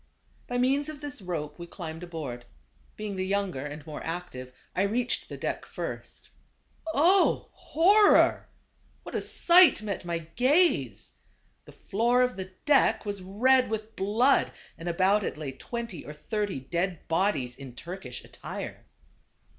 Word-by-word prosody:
By 245 - -2
means 275 +4 +2
of 305 -2 -7
this 290 -6 -6
rope 160 -4 -5
we 170 - -7
climbed 165 -2 -7
aboard. 150 -9 -6 0.5
Being 210 -2 -5
the 185 - -1
younger 195 -8 -1
and 145 0 -7
more 155 -2 -7
active 160 -7 -6 0.2
I - - +1
reached 235 +5 -1
the - - -7
deck - - -3
first. - - -7 0.6
Oh! 355 +6 +3
horror! 405 +6 +4 0.5
what - - -9
a - - -1
sight 345 -9 +5
met 200 -3 -3
my 170 -1 -2 0.2
gaze. 300 +8 +2 0.5
The - - -13
floor 235 +4 +1
of 250 0 0
the 190 0 -6
deck 290 -6 +4
was 205 -2 -4
red 250 +8 +3
with 220 0 -4
blood 225 +8 +3 0.2
and 165 +2 -5
about 190 +4 +3
it - - -3
lay 150 -3 -4
twenty 230 - -6
or 150 - -8
thirty 195 +4 -3
dead 170 +5 -3
bodies 160 -8 0
in 130 -3 -10
Turkish 170 -6 -7
attire. - - -8
195 Hz, 145 wpm, -28 LUFS, 165-245 Hz, 0.6 s, sight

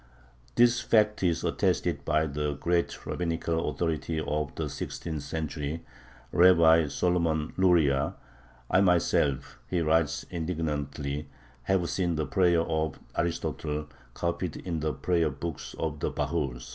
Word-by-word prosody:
This 120 0 +5
fact 105 -1 +3
is 85 -3 +1
attested - - 0
by 75 +1 +2
the 75 0 -2
great 85 +4 -1
rabbinical 85 -1 -1
authority 80 -1 -2
of 75 -1 -2
the 80 - -2
sixteenth 75 +2 -5
century, 75 +1 -4 0.5
Rabbi 85 -3 +6
Solomon 80 0 0
Luria. 80 -7 +3 0.6
"I 95 - +5
myself" 70 -8 +2
he 90 - 0
writes 80 -2 +2
indignantly 75 -4 -3 0.4
"have 95 -3 +2
seen 85 -2 0
the 80 -1 -1
prayer 90 -3 +3
of 80 -3 -1 0.2
Aristotle 75 -3 -2 0.3
copied 85 0 -2
in 85 -3 -3
the 75 0 0
prayer 85 -2 +1
books 75 +2 -6
of 75 -2 -3
the - - 0
bahurs." 60 -2 -2
80 Hz, 125 wpm, -28 LUFS, 75-85 Hz, 0.6 s, Rabbi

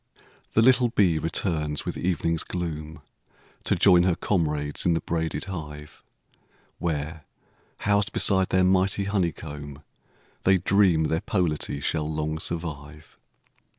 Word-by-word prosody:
The 110 - +4
little 125 0 +5
bee 90 -8 +2
returns 80 -2 -1
with - - -3
evening's 85 -2 0
gloom, 80 -3 -5 0.6
To - - +2
join 90 -3 +5
her 90 -1 +2
comrades 75 -7 -1
in 85 -2 +2
the - - +1
braided 80 0 -2
hive, 75 -5 -8 0.8
Where, 80 -1 -3 0.6
housed 100 0 +1
beside 95 -2 +3
their 95 0 +3
mighty 95 +2 +2
honeycomb, 75 -7 -3 0.6
They 95 0 +4
dream 90 -3 +3
their 80 +1 0
polity 80 -7 -1
shall 75 +1 -1
long 75 0 -2
survive. 75 -3 -6
85 Hz, 120 wpm, -25 LUFS, 75-95 Hz, 0.8 s, little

